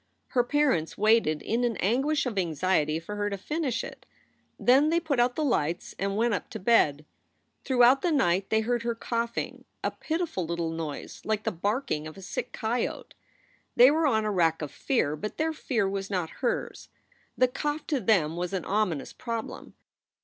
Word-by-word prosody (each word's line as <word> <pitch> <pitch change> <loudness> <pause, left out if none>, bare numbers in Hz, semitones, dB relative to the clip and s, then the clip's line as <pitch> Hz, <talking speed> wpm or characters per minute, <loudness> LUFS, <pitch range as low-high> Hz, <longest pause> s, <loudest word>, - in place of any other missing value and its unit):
Her 245 -3 +2
parents 260 - +1
waited 215 -8 +3
in 235 +3 0
an 235 -4 0
anguish 275 - +1
of 245 -4 -3
anxiety 160 -2 +1
for 205 +5 -7
her 205 0 0
to 200 - -3
finish 290 - -2
it. - - -10 0.5
Then 270 +5 +5
they 335 +1 +3
put 310 -6 -1
out 245 +1 +3
the 310 - -1
lights 175 - 0
and 195 +1 -1
went 230 0 +2
up - - -3
to 220 - -6
bed. 155 -9 +3 0.6
Throughout 255 +1 +5
the 350 - +1
night 195 - +2
they 220 0 +3
heard 240 +1 0
her 235 0 -2
coughing, 235 0 -3 0.2
a - - 0
pitiful 325 - -2
little 170 -1 -2
noise 160 -3 -6
like 215 -1 -1
the - - 0
barking 195 - -2
of 155 - -10
a 195 - -10
sick - - -4
coyote. 230 +2 -3 0.6
They 250 +3 +8
were 315 +1 +2
on 220 -5 +2
a 210 - 0
rack 165 -4 +2
of 145 - -5
fear, 190 - 0
but 210 +8 -6
their 320 +1 0
fear 235 -9 -1
was 195 0 -3
not 180 -5 -2
hers. 245 - -2 0.5
The 255 - +5
cough 295 +4 -3
to 290 -4 0
them 175 -10 +2
was 180 +2 -3
an 185 -3 -2
ominous 190 -8 -1
problem. 230 -2 -6
220 Hz, 185 wpm, -27 LUFS, 175-255 Hz, 0.6 s, They